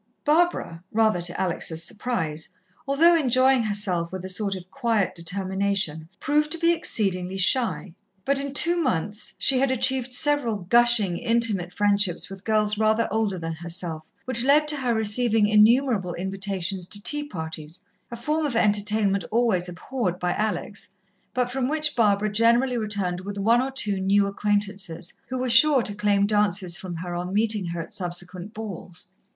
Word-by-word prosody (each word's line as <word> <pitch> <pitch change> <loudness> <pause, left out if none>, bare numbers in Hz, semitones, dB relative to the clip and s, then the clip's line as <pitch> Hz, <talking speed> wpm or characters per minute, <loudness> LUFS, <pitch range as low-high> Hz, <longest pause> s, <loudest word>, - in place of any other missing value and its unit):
Barbara, 300 - +1
rather 220 -5 +2
to 175 0 -4
Alex' 165 -3 -1
surprise, 165 -7 -3 0.4
although 325 +5 +4
enjoying 260 -3 +3
herself 200 -6 -2
with 185 -1 -6
a - - -6
sort 195 +1 -1
of 185 0 -11
quiet 225 -8 0
determination, 190 -2 -2
proved 300 +2 0
to - - -4
be 335 0 +3
exceedingly 190 - -1
shy, 195 -2 +1 0.3
but 280 0 +3
in 280 0 -6
two 345 +5 +3
months 210 - -2
she 265 -1 +3
had 270 0 +2
achieved 260 0 0
several 275 -3 +2
gushing, 210 -1 +3
intimate 220 -6 0
friendships 200 -2 0
with 195 0 -10
girls 215 -1 0
rather 220 +1 +2
older 215 -3 -1
than 165 -1 -5
herself, 170 0 -5 0.2
which 250 -2 +1
led 295 +3 +4
to 300 - +1
her 250 -4 -1
receiving 220 0 +2
innumerable 215 -3 +3
invitations 190 -1 -2
to 205 +1 -3
tea 295 0 0
parties, 160 - -7 0.3
a 235 - -6
form 300 +7 -2
of 285 -5 -2
entertainment 210 -2 +1
always 215 -6 +1
abhorred 180 0 -4
by 180 0 -1
Alex, 210 -1 -3 0.5
but 250 -1 +1
from 260 0 -1
which 300 0 -1
Barbara 210 -2 +2
generally 235 +4 +2
returned 205 -5 -1
with 200 +1 -7
one 230 +5 +3
or 265 - -2
two 210 -7 0
new 200 +1 +2
acquaintances, 200 -4 -1
who 255 - -4
were 255 0 -2
sure 260 +2 +6
to 205 - -3
claim 205 -1 +1
dances 200 -4 +1
from 180 -1 -6
her 175 +1 -6
on 175 +1 -4
meeting 210 -1 0
her 170 0 -4
at 165 - -7
subsequent 180 +2 -4
balls. 195 -5 -8
210 Hz, 165 wpm, -24 LUFS, 185-245 Hz, 0.5 s, sure